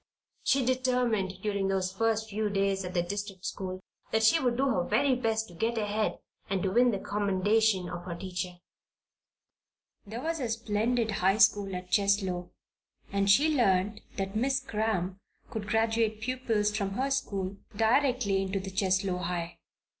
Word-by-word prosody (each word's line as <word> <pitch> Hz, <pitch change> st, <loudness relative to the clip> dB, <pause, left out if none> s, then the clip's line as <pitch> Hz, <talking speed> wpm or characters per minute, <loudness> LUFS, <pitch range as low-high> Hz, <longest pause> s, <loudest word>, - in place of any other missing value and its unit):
She 270 Hz, -2 st, +2 dB
determined, 245 Hz, -7 st, 0 dB
during 200 Hz, -2 st, 0 dB
those 190 Hz, -1 st, 0 dB
first 220 Hz, +1 st, 0 dB
few 215 Hz, 0 st, -1 dB
days 195 Hz, -1 st, 0 dB
at 180 Hz, +1 st, -6 dB
the 175 Hz, -, +2 dB
district 200 Hz, 0 st, -5 dB
school, 185 Hz, 0 st, -4 dB, 0.3 s
that 220 Hz, 0 st, +2 dB
she 225 Hz, +9 st, +5 dB
would 245 Hz, -3 st, 0 dB
do 270 Hz, -, +2 dB
her 190 Hz, -9 st, +1 dB
very 255 Hz, +8 st, +2 dB
best 225 Hz, -3 st, 0 dB
to -, -, -13 dB
get 225 Hz, +7 st, -1 dB
ahead 210 Hz, 0 st, 0 dB, 0.3 s
and 190 Hz, -2 st, 0 dB
to 190 Hz, -, 0 dB
win 245 Hz, +4 st, +5 dB
the 210 Hz, -, 0 dB
commendation 205 Hz, 0 st, +1 dB
of 175 Hz, 0 st, -6 dB
her 175 Hz, -2 st, -4 dB
teacher. 180 Hz, 0 st, -4 dB, 1.5 s
There 230 Hz, +5 st, -6 dB
was 325 Hz, 0 st, -1 dB
a 250 Hz, -4 st, -2 dB
splendid 225 Hz, +1 st, 0 dB
high 195 Hz, 0 st, +2 dB
school 200 Hz, -2 st, +4 dB
at 180 Hz, 0 st, -7 dB
Cheslow, 195 Hz, -3 st, +1 dB, 0.6 s
and 200 Hz, 0 st, +1 dB
she 300 Hz, +10 st, +5 dB
learned 200 Hz, -4 st, +2 dB, 0.2 s
that 195 Hz, +1 st, -3 dB
Miss 260 Hz, +4 st, +2 dB
Cramp 210 Hz, -7 st, -2 dB, 0.3 s
could 210 Hz, -2 st, -4 dB
graduate 225 Hz, 0 st, +1 dB
pupils 225 Hz, -3 st, 0 dB
from 200 Hz, -2 st, -1 dB
her 265 Hz, +6 st, -1 dB
school 195 Hz, -7 st, -2 dB, 0.2 s
directly 230 Hz, -3 st, +2 dB
into 195 Hz, 0 st, -2 dB
the 190 Hz, 0 st, -6 dB
Cheslow 190 Hz, -1 st, +1 dB
High. 175 Hz, -1 st, -4 dB
205 Hz, 160 wpm, -29 LUFS, 190-225 Hz, 1.5 s, she